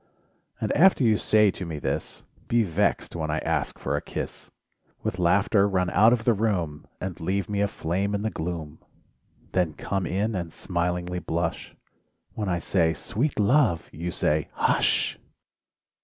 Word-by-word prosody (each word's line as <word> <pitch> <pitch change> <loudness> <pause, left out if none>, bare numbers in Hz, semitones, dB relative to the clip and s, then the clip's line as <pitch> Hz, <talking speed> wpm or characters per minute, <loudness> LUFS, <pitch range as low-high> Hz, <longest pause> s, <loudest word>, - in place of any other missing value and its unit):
And - - -1
after 185 -3 +5
you 110 -2 +4
say 105 -1 +4
to 95 - -7
me 80 -3 -5
this, 75 - -3 0.2
Be 120 -1 +3
vexed 100 +1 0
when 80 -2 -2
I 80 - 0
ask 80 -4 -1
for - - -2
a - - -1
kiss, - - -6 0.5
With 90 - -2
laughter 100 +3 +3
run 90 -2 0
out 110 +2 +6
of 120 -2 +1
the 120 - +5
room, 90 -9 -1
And 95 -1 -5
leave 95 +2 -1
me 100 -1 -1
aflame 100 0 -1
in 100 - -2
the 110 - -1
gloom... 80 -2 -5 0.7
Then 90 -4 0
come 95 -2 -2
in 105 +5 0
and 85 -4 -3
smilingly 90 0 -2
blush; 85 0 -3 0.6
When 105 -3 -3
I 85 - +1
say: 80 -1 +1
"sweet 125 - -2
love 105 - +3
1" 80 - -10
you 90 - -1
say: 75 -2 0
"hush!" - - +2
90 Hz, 165 wpm, -26 LUFS, 85-105 Hz, 0.7 s, out